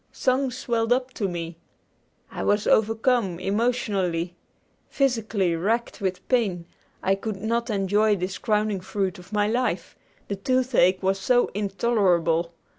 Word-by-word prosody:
Songs 255 -1 0
swelled 230 -2 -1
up 255 +1 +1
to 205 - -1
me. 170 -2 -5 0.7
I - - -5
was 205 0 +1
overcome, 220 -4 +2
emotionally. 195 -5 -1 0.5
Physically 220 -9 +1
racked 225 +7 -1
with 185 -1 -3
pain, 200 -9 +1 0.4
I 190 - +3
could 205 +2 -3
not 230 +4 -2
enjoy 205 +1 +2
this 185 0 -4
crowning 210 -2 0
fruit 190 0 -2
of 180 +2 -15
my 210 -1 +1
life, 245 +3 -1 0.3
the 200 - -2
toothache 235 -4 +2
was 195 +1 +1
so 245 +5 +2
intolerable. 195 -5 +1
205 Hz, 130 wpm, -25 LUFS, 185-235 Hz, 0.7 s, I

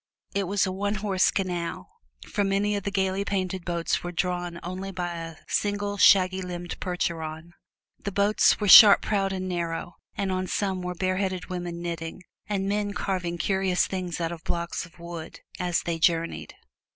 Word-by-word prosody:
It 200 0 0
was 200 +1 +2
a 190 - -2
one 200 +2 -1
horse 190 -2 +2
canal, 175 - -3 0.4
for 205 - 0
many 200 +1 +1
of 200 - -2
the - - 0
gaily 190 0 0
painted 190 -2 -2
boats 170 -1 -1
were 175 - -4
drawn 175 -1 -2
only 185 +2 -5
by 175 -2 -3
a 165 -1 -6
single, 205 0 -1
shaggy 190 -1 +5
limbed 175 -1 -6
Percheron. 165 -2 -3 0.5
The 200 - -3
boats 200 +2 +3
were 210 - -1
sharp 205 +1 +10
prowed 195 -2 0
and 185 -1 -3
narrow; 170 -1 -3 0.2
and 195 -1 -1
on 185 0 -1
some 190 -2 -1
were 180 0 -4
bareheaded 185 0 -2
women 175 -1 -4
knitting, 170 +1 -5 0.3
and 195 -2 -1
men 205 0 -1
carving 180 -3 -2
curious 190 +1 +1
things 180 -3 -4
out 165 -1 -1
of 170 -2 -8
blocks 170 0 -3
of 170 - -22
wood, 170 -1 -8 0.2
as 175 -1 0
they 170 -1 -2
journeyed. 165 0 0
185 Hz, 175 wpm, -26 LUFS, 170-195 Hz, 0.5 s, sharp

